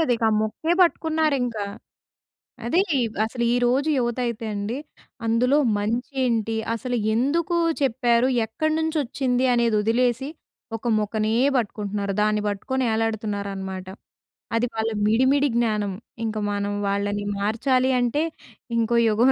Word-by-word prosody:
ఇక 230 - -5
ఆ - - 0
ముక్కే 315 +10 -1
పట్టుకున్నారింకా. 305 - +1 1.0
అదే 335 +11 +3 0.4
అసలు 235 +2 -3
ఈరోజు 245 +5 +2
యువత 240 -1 0
అయితే 235 -1 -3
అండి, 205 +4 -3 0.5
అందులో 245 +5 +3 0.2
మంచి 235 +6 -2
ఏంటి? 225 -2 0 0.2
అసలు 245 +2 -3 0.2
ఎందుకూ 325 +8 +1 0.2
చెప్పారు? 245 -1 +2 0.2
ఎక్కడినుంచొచ్చింది? 285 -2 0
అనేది 235 -2 +2
వదిలేసి 245 +4 +1 0.5
ఒక 235 - -6
ముక్కనే 215 +1 -1 0.2
బట్టుకుంటున్నారు. 205 -3 -2
దాన్ని 210 0 +1
బట్టుకొని 260 +6 -2
ఎలాడుతున్నారనమాట. 200 -4 -3 0.7
అది 235 - +1
వాళ్ళ 220 0 0 0.2
మిడి, 225 +4 +3
మిడి 285 0 +2
జ్ఞానం, 210 -4 0 0.3
ఇంక 220 -1 -3 0.2
మనం 205 0 -2 0.2
వాళ్ళని 205 +1 -1
మార్చాలి 255 +5 +1
అంటే 245 +6 +1 0.5
ఇంకో 230 +1 +2
యుగం 235 +5 +4
235 Hz, 115 wpm, -24 LUFS, 215-260 Hz, 1.0 s, యుగం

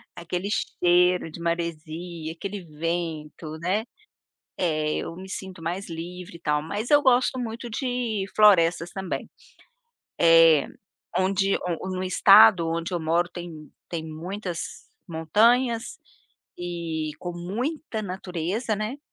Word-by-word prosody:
aquele 175 +3 -4
cheiro, 180 -4 +2
de 170 - -9
maresia, 170 0 -3
aquele 200 +3 -6
vento, 160 -1 -4
né. 185 +6 0 0.7
Eh, 155 -4 0
eu 165 - -5
me 190 +1 -10
sinto 185 -3 -7
mais 175 +3 -3
livre 170 +2 -7
e - - -25
tal, 150 -2 0
mas 205 - -4
eu 290 0 +7
gosto 255 0 +3
muito 235 0 -5
de 240 -4 -2
florestas, 175 -5 +5
também. 190 -2 -4 0.9
Eh, 165 -3 +7 0.5
onde 195 +1 +2 0.3
o 190 - -4
no 185 0 -3
estado 195 -1 +7
onde 170 +2 -2
eu 175 - 0
moro, 170 +2 +1
tem 165 -4 -9 0.2
tem 165 -2 -3
muitas 175 - -6 0.2
montanhas 225 +9 +2 0.6
e 170 -3 -3
com 175 - -4
muita 220 - -3
natureza, 190 +3 -3
né. 215 +7 -4
175 Hz, 120 wpm, -25 LUFS, 165-205 Hz, 0.9 s, eu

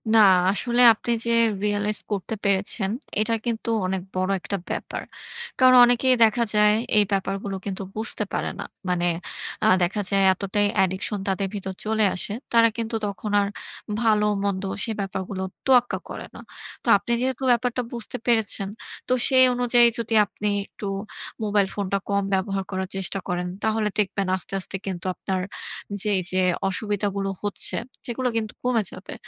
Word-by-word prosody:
না, - - +7 0.3
আসলে 240 +4 +1
আপনি 235 +2 -4
যে 235 - +1 0.3
রিয়ালাইজ 205 0 0
করতে 205 +2 -2
পেরেছেন, 195 -1 0 0.3
এটা 230 +1 0
কিন্তু 230 -1 -2 0.2
অনেক 190 0 -1
বড় 185 +1 0
একটা 200 - -3
ব্যাপার। - - -4 0.6
কারণ, 255 0 +7
অনেকেই 250 +1 +3
দেখা 225 +2 +3
যায়, 210 0 +5 0.2
এই 210 - +7
ব্যাপারগুলো 195 0 -2
কিন্তু, 195 0 -4
বুঝতে 220 +1 -2
পারে - - -1
না। - - -4 0.2
মানে 175 -1 +1 0.6
আ - - +5 0.2
দেখা 205 +4 0
যায়, 195 -1 +3
এতটাই 205 +2 0
অ্যাডিকশন 190 +2 0
তাদের 195 0 0
ভিতর 190 -1 -4
চলে 220 -1 +2
আসে। 200 +3 -4 0.2
তারা 230 0 +7
কিন্তু 225 0 -2
তখন 205 +1 -4
আর 200 - 0 0.5
ভাল, 215 -2 +4 0.2
মন্দ, 200 -1 -1 0.2
সে 225 - -2
ব্যাপারগুলো 190 0 -4 0.2
তোয়াক্কা 250 -2 +4
করে - - -6
না। - - -9 0.4
তো, - - -9
আপনি 205 +4 -6
যেহেতু 260 0 -1
ব্যাপারটা 245 +1 +1
বুঝতে 235 -2 -5
পেরেছেন, 220 -4 +1 0.4
তো 255 - +2
সেই 260 -1 +6
অনুযায়ী 245 -1 +5
যদি, 230 0 -3
আপনি 210 +1 -5 0.2
একটু, 205 - -8 0.6
মোবাইল 205 -2 +2
ফোনটা 200 -1 -1
কম 200 0 +1
ব্যবহার 195 0 0
করার 190 0 -3
চেষ্টা 195 +1 -2
করেন, 180 0 -2 0.2
তাহলে 220 -1 +1
দেখবেন 195 -1 0
আস্তে, 190 - -8
আস্তে 190 - -8
কিন্তু 185 -2 -5
আপনার 190 -1 -2 0.6
যে, 215 - -4
এই 185 - -1
যে, 185 0 +1 0.3
অসুবিধাগুলো 200 0 -2
হচ্ছে, 205 - -1 0.3
সেগুলো 250 +1 -2
কিন্তু 215 -1 -3
কমে 240 -4 +2
যাবে। 185 - -9
205 Hz, 160 wpm, -24 LUFS, 195-230 Hz, 0.6 s, না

